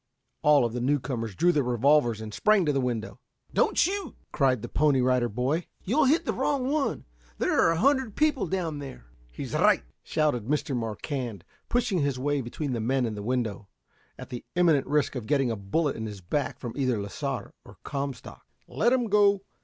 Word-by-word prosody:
All 145 -4 +5
of 115 - -3
the 125 - -3
newcomers 125 -5 -1
drew 175 - +4
their 150 -4 +2
revolvers 125 -2 +2
and 110 -1 -7
sprang 210 - +3
to 150 - +1
the 135 - +1
window. 120 -3 -3 0.3
"Don't - - +2
shoot!" 380 - 0 0.2
cried 130 -4 +1
the - - -4
Pony 145 +1 +2
Rider 125 -1 +2
Boy; 130 +10 -1 0.2
"You'll 270 +10 +2
hit 300 +6 +3
the - - 0
wrong 275 -2 0
one. 300 -2 -1 0.3
There - - +1
are - - +5
a 165 - +1
hundred 265 - +2
people 300 -9 +1
down 165 -4 -2
there." 135 - -9 0.3
"He's - - -7
right!" - - +4 0.2
shouted 150 -8 0
Mr. 145 -1 -1
Marquand, 115 - -4 0.3
pushing 240 -6 +1
his 140 -3 0
way 145 +2 0
between 130 +3 -4
the 120 - -2
men 130 +3 +1
and 110 -2 -3
the 105 - -6
window, 110 -3 -2 0.5
at - - -9
the 120 - -6
imminent 165 -6 +3
risk 150 +1 +1
of 125 -5 -5
getting 135 -4 +2
a - - -1
bullet 120 +10 -1
in 110 0 -4
his 105 -2 -7
back 140 +11 -2
from 120 -3 -6
either 130 -5 0
Lasar 130 +6 -4
or - - -15
Comstock. 140 -3 -6 0.2
"Let 235 +3 +2
'em 250 -2 +2
go. 205 -2 +4
140 Hz, 195 wpm, -27 LUFS, 120-170 Hz, 0.5 s, All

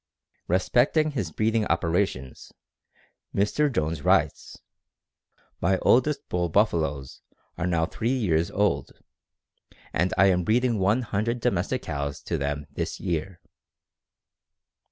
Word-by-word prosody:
Respecting 125 - +2
his 100 - -3
breeding 110 +4 0
operations 85 -6 -1 0.8
Mr. 140 +9 +1
Jones 80 - -1
writes: - - +1 1.0
"My 95 +2 +2
oldest 140 +3 +3
[bull] 90 -1 -1
buffaloes 80 -8 0 0.3
are 90 - -2
now 85 -2 +1
three 115 +7 -2
years 85 -8 +1
old, 95 -10 0 1.0
and 90 +3 +1
I 95 - +6
am 90 -2 +3
breeding 115 +3 +1
one 105 +7 +2
hundred 115 +3 -1
domestic - - -1
cows 70 -1 -4
to - - -2
them 70 +1 -2
this - - -4
year. 85 0 -3
95 Hz, 115 wpm, -26 LUFS, 80-115 Hz, 1.0 s, I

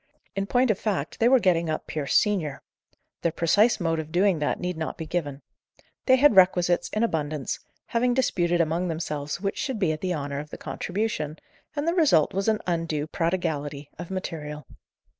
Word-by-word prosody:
In 195 0 -1
point 245 0 +3
of 200 - -2
fact, 190 -9 -2
they 230 - +5
were 265 - +7
getting 170 -5 +2
up 155 - -2
Pierce 145 -3 -2
senior. 180 -10 +1 0.6
Their 170 - +1
precise 205 +8 +3
mode 165 -2 0
of 155 0 -6
doing 180 -1 +3
that 150 - -1
need 180 0 -2
not 160 -1 -4
be 160 - -5
given. 150 -4 -3 0.6
They 260 - +7
had 275 -3 +5
requisites 180 -2 +4
in 215 - 0
abundance, 155 - -2 0.3
having 245 +1 +1
disputed 175 -9 +2
among 165 +3 0
themselves 155 -2 -3
which 195 -1 -2
should 265 -4 -2
be 185 -6 +1
at 155 - -4
the 180 -1 -1
honour 140 -1 -3
of 150 +1 -7
the - - -8
contribution, 180 -6 -3 0.4
and 290 +2 -2
the 335 - +3
result 290 - +4
was 195 +2 -1
an 215 -1 +2
undue 165 -4 -1
prodigality 155 -4 -2
of 175 - -6
material. 155 -6 -5
175 Hz, 185 wpm, -26 LUFS, 155-200 Hz, 0.6 s, were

